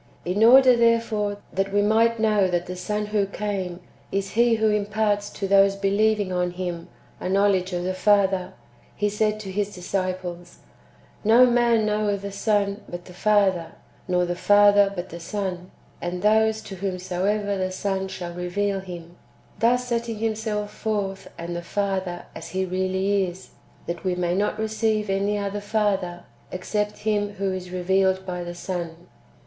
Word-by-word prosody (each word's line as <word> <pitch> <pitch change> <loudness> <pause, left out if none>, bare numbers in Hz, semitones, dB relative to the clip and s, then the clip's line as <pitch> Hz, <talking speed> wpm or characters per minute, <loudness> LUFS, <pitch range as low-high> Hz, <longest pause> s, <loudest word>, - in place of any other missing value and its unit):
In 185 +5 +1
order, 255 +2 +8
therefore, 230 -3 +1 0.2
that 195 +1 -1
we 205 +1 +2
might 225 +2 +3
know 210 -3 +3
that 175 -1 -1
the 180 - -6
Son 210 +3 -2
who 210 -1 0
came 195 -3 -4 0.3
is 195 -1 -2
He 235 0 +3
who 220 -1 +2
imparts 205 0 0
to 200 - -4
those 195 0 +5
believing 200 0 +1
on 180 0 0
Him 175 -1 -5 0.3
a 180 - -3
know 200 +2 +4
ledge 190 -1 +1
of 175 0 -2
the 185 +1 -1
Father, 190 -1 +2 0.4
He 210 - 0
said 210 +1 0
to 195 -2 -6
His 205 +1 -2
disciples: 180 -1 -4 0.3
" - - -30
No 250 +2 +8
man 235 -2 +3
knoweth 210 -2 0
the 200 - -4
Son 200 0 0
but 175 0 -7
the 180 - -12
Father, 190 -4 +2 0.3
nor 180 -1 +2
the 175 0 -2
Father 205 +1 +5
but 175 0 -5
the 170 - -8
Son, 185 -1 -4 0.3
and 180 +1 -4
those 220 +1 +3
to 195 -2 -8
whomsoever 195 +2 -1
the 185 -1 -2
Son 190 0 -2
shall 180 -2 -6
reveal 195 +3 -1
Him 175 -2 -9 0.2
;" - - -29
thus 245 +3 +2
setting 235 -2 -2
Himself 215 -1 -2
forth 200 -3 -3
and 170 +1 -5
the 175 - -3
Father 190 -1 -2
as - - -8
He 190 0 -1
[really] 190 +2 0
is, 180 +2 -10 0.3
that 170 0 -5
we 185 -2 0
may 175 -1 0
not 205 +3 0
receive 220 -1 0
any 200 +2 0
other 200 0 -3
Father, 200 -4 -1 0.3
except 210 +3 -2
Him 205 -1 0
who 195 -1 -2
is 185 -1 -6
revealed 190 +1 +1
by 180 -1 -4
the 175 0 -6
Son. 175 -1 -5
195 Hz, 170 wpm, -24 LUFS, 185-210 Hz, 0.4 s, order